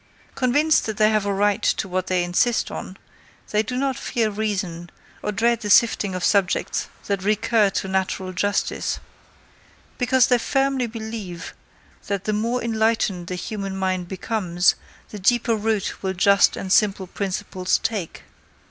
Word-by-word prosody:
Convinced 290 Hz, +4 st, +2 dB
that 215 Hz, -2 st, -4 dB
they 215 Hz, 0 st, +4 dB
have 215 Hz, -2 st, +1 dB
a -, -, +1 dB
right 205 Hz, +1 st, +1 dB
to -, -, 0 dB
what 185 Hz, 0 st, -2 dB
they 180 Hz, -1 st, +1 dB
insist 180 Hz, +7 st, +1 dB
on, 185 Hz, -, -7 dB, 0.5 s
they 210 Hz, -, +3 dB
do 250 Hz, +3 st, -4 dB
not 270 Hz, 0 st, 0 dB
fear 230 Hz, -4 st, -1 dB
reason, 195 Hz, -5 st, -3 dB, 0.3 s
or 210 Hz, -, -2 dB
dread 230 Hz, +3 st, +1 dB
the 210 Hz, -, -4 dB
sifting 205 Hz, -3 st, +4 dB
of 180 Hz, -, -4 dB
subjects 195 Hz, -3 st, +1 dB, 0.2 s
that 200 Hz, -1 st, -1 dB
recur 215 Hz, 0 st, +2 dB
to 195 Hz, -, -3 dB
natural 190 Hz, 0 st, -2 dB
justice: 205 Hz, +2 st, -1 dB, 1.0 s
because 255 Hz, 0 st, +4 dB
they 245 Hz, -1 st, +3 dB
firmly 270 Hz, 0 st, 0 dB
believe, 220 Hz, -6 st, -7 dB, 0.5 s
that 200 Hz, -2 st, -2 dB
the 215 Hz, -, -1 dB
more 230 Hz, +4 st, -1 dB
enlightened 220 Hz, -5 st, 0 dB
the 180 Hz, -, -3 dB
human 195 Hz, +1 st, -5 dB
mind 185 Hz, -2 st, -1 dB
becomes, 185 Hz, -2 st, +1 dB, 0.4 s
the 210 Hz, -, -8 dB
deeper 230 Hz, +3 st, +2 dB
root 215 Hz, -2 st, -1 dB
will 190 Hz, -1 st, -1 dB
just 200 Hz, +2 st, +4 dB
and 190 Hz, -1 st, -1 dB
simple 200 Hz, -3 st, +3 dB
principles 185 Hz, -1 st, -2 dB
take. 200 Hz, -7 st, -4 dB
205 Hz, 155 wpm, -23 LUFS, 190-225 Hz, 1.0 s, they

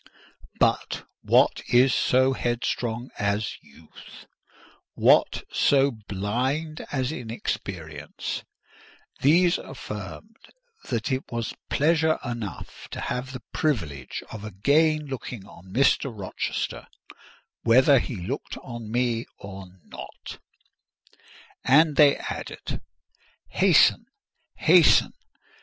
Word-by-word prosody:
But -, -, +1 dB, 0.2 s
what -, -, +3 dB
is 125 Hz, +2 st, +5 dB
so 130 Hz, +1 st, +3 dB
headstrong 120 Hz, -1 st, -2 dB
as 100 Hz, +1 st, -1 dB
youth? 75 Hz, +3 st, -15 dB, 0.7 s
What -, -, +4 dB
so 140 Hz, 0 st, +3 dB
blind 120 Hz, +9 st, -3 dB
as 130 Hz, -2 st, -1 dB
inexperience? 95 Hz, -, -5 dB, 0.8 s
These 170 Hz, +5 st, +4 dB
affirmed 130 Hz, -, -8 dB, 0.5 s
that 115 Hz, +1 st, -1 dB
it 130 Hz, +1 st, -3 dB
was 115 Hz, -1 st, -3 dB, 0.2 s
pleasure 160 Hz, +1 st, +2 dB
enough 115 Hz, -, -6 dB
to -, -, -5 dB
have 125 Hz, +1 st, -3 dB
the 130 Hz, -3 st, -8 dB
privilege 80 Hz, -, -2 dB
of 105 Hz, -2 st, -8 dB
again 150 Hz, -, +2 dB
looking 125 Hz, -6 st, -6 dB
on 95 Hz, -1 st, -15 dB
Mr. 135 Hz, +3 st, +3 dB
Rochester, 100 Hz, -5 st, -4 dB, 0.7 s
whether 130 Hz, +4 st, +5 dB
he 120 Hz, -, -4 dB
looked 105 Hz, +10 st, -5 dB
on 120 Hz, -3 st, -8 dB
me 120 Hz, -1 st, 0 dB
or 95 Hz, -1 st, -9 dB, 0.2 s
not; -, -, -10 dB, 1.2 s
and 150 Hz, +3 st, +5 dB
they 145 Hz, -2 st, +6 dB
added—"Hasten! -, -, 0 dB, 0.5 s
hasten! -, -, +5 dB
120 Hz, 95 wpm, -25 LUFS, 105-140 Hz, 1.2 s, they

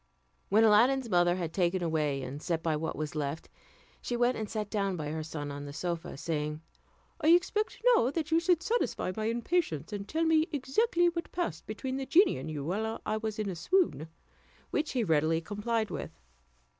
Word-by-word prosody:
When 215 Hz, +3 st, +5 dB
Aladdin's 235 Hz, +3 st, +4 dB
mother 175 Hz, 0 st, +4 dB
had 170 Hz, -3 st, -4 dB
taken 180 Hz, -1 st, +1 dB
away 150 Hz, -4 st, 0 dB
and 135 Hz, +3 st, -6 dB
set 165 Hz, -1 st, -2 dB
by 160 Hz, -2 st, +1 dB
what 160 Hz, +1 st, -3 dB
was 155 Hz, -1 st, -4 dB
left, 150 Hz, 0 st, -3 dB, 0.5 s
she 240 Hz, -, -2 dB
went 245 Hz, +1 st, +3 dB
and 215 Hz, -2 st, -4 dB
sat 215 Hz, -2 st, -3 dB
down 200 Hz, -3 st, 0 dB
by 150 Hz, -2 st, -4 dB
her 160 Hz, +1 st, -3 dB
son 150 Hz, -2 st, -5 dB
on 145 Hz, 0 st, -6 dB
the 145 Hz, -, -7 dB
sofa, 170 Hz, -2 st, -4 dB
saying, 150 Hz, 0 st, -2 dB, 0.6 s
"I -, -, +3 dB
expect 355 Hz, +7 st, +3 dB, 0.2 s
now 240 Hz, -, +3 dB
that 320 Hz, +2 st, -3 dB
you 325 Hz, -, +5 dB
should 340 Hz, -1 st, +2 dB
satisfy 460 Hz, -, 0 dB
my 215 Hz, -, -2 dB
impatience, 230 Hz, -, -1 dB
and 200 Hz, -1 st, -5 dB
tell 320 Hz, +1 st, 0 dB
me 320 Hz, 0 st, +4 dB
exactly 345 Hz, -, +2 dB
what 340 Hz, 0 st, -5 dB
passed 255 Hz, -, -3 dB
between 260 Hz, +5 st, -4 dB
the 270 Hz, -1 st, -4 dB
genie 350 Hz, -, +4 dB
and 140 Hz, +4 st, -6 dB
you 145 Hz, -3 st, -4 dB
while 220 Hz, +6 st, -2 dB
I 215 Hz, -, 0 dB
was 220 Hz, 0 st, -3 dB
in 215 Hz, -1 st, -2 dB
a 190 Hz, -, -3 dB
swoon"; 245 Hz, -, +1 dB, 0.6 s
which 310 Hz, 0 st, -1 dB
he 250 Hz, -3 st, +1 dB
readily 160 Hz, -2 st, +2 dB
complied 210 Hz, +5 st, -2 dB
with. 75 Hz, -, -4 dB
210 Hz, 195 wpm, -30 LUFS, 160-270 Hz, 0.6 s, When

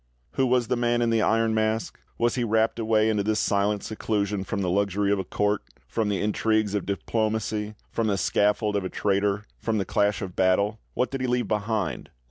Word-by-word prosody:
Who 130 Hz, -, +1 dB
was 125 Hz, -2 st, +2 dB
the 125 Hz, -, +1 dB
Man 120 Hz, 0 st, +1 dB
in 115 Hz, -, +1 dB
the 115 Hz, -1 st, +2 dB, 0.3 s
Mask? 110 Hz, 0 st, -1 dB, 0.2 s
Was 120 Hz, 0 st, +2 dB
he 125 Hz, -, 0 dB
rapt 110 Hz, 0 st, +1 dB
away 110 Hz, -1 st, +2 dB
into 105 Hz, -2 st, +1 dB
this 110 Hz, +1 st, 0 dB
silent 100 Hz, 0 st, +1 dB
seclusion 105 Hz, -2 st, -2 dB
from 100 Hz, 0 st, -3 dB
the 90 Hz, -, 0 dB
luxury 100 Hz, +1 st, +1 dB
of 100 Hz, -, +2 dB
a -, -, -1 dB
court, 105 Hz, +3 st, 0 dB, 0.3 s
from 110 Hz, -, -1 dB
the 100 Hz, -, 0 dB
intrigues 110 Hz, 0 st, +1 dB
of 100 Hz, -3 st, -2 dB
diplomacy, 110 Hz, +1 st, -1 dB, 0.2 s
from 115 Hz, -1 st, 0 dB
the 100 Hz, -2 st, +1 dB
scaffold 105 Hz, +3 st, +1 dB
of 100 Hz, -, 0 dB
a 95 Hz, -, -3 dB
traitor, 100 Hz, 0 st, 0 dB, 0.2 s
from 115 Hz, -1 st, -1 dB
the 100 Hz, -, 0 dB
clash 105 Hz, 0 st, +1 dB
of 95 Hz, -1 st, -6 dB
battle? 100 Hz, +3 st, +2 dB, 0.2 s
What 125 Hz, -, 0 dB
did 135 Hz, -1 st, -3 dB
he 130 Hz, -, 0 dB
leave 125 Hz, -2 st, 0 dB
behind? 105 Hz, -1 st, -2 dB
105 Hz, 205 wpm, -26 LUFS, 100-110 Hz, 0.3 s, was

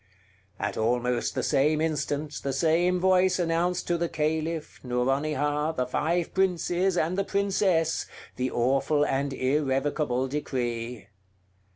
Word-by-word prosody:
At -, -, -2 dB
almost 120 Hz, +2 st, 0 dB
the -, -, -1 dB
same 150 Hz, +3 st, +2 dB
instant 150 Hz, -1 st, -1 dB
the 140 Hz, -, -2 dB
same 170 Hz, +5 st, +2 dB
voice 185 Hz, 0 st, +3 dB
announced 175 Hz, +1 st, 0 dB
to 175 Hz, -1 st, 0 dB
the 170 Hz, 0 st, 0 dB
Caliph, 160 Hz, 0 st, -2 dB
Nouronihar, 145 Hz, +4 st, 0 dB
the 125 Hz, -5 st, -1 dB
five 160 Hz, +7 st, -1 dB
princes, 185 Hz, 0 st, +1 dB
and 175 Hz, +4 st, 0 dB
the -, -, +2 dB
princess, 195 Hz, -5 st, +1 dB, 0.3 s
the 130 Hz, +1 st, -1 dB
awful 135 Hz, +5 st, +1 dB
and 140 Hz, 0 st, -1 dB
irrevocable 135 Hz, -1 st, 0 dB
decree. 125 Hz, -5 st, -3 dB
150 Hz, 120 wpm, -27 LUFS, 135-170 Hz, 0.3 s, voice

